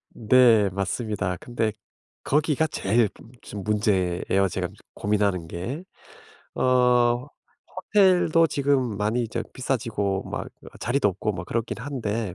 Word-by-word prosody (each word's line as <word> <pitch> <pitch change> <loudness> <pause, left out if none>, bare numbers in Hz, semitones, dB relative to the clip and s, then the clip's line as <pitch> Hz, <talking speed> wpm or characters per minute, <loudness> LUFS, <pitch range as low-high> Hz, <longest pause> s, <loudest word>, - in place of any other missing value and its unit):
네 115 -2 +4
맞습니다. 100 -1 -2
근데 115 -3 -2 0.5
거기가 150 +1 +1
제일 110 -4 +1 0.3
좀 100 -1 -7
문제에요, 100 -2 +1
제가 90 0 -2 0.3
고민하는 100 -5 0
게. 115 - -5 0.7
어 125 0 +3 0.5
호텔도 185 -4 +4
지금 135 -7 0
많이 110 +3 0
저 115 +1 -3
비싸지고 115 -7 -2
막 - - -4 0.3
자리도 120 -1 +1
없고 105 +3 -2
막 90 -2 -6
그렇긴 115 +2 -3
한데 115 -7 -3
115 Hz, 240 characters per minute, -25 LUFS, 100-130 Hz, 0.7 s, 네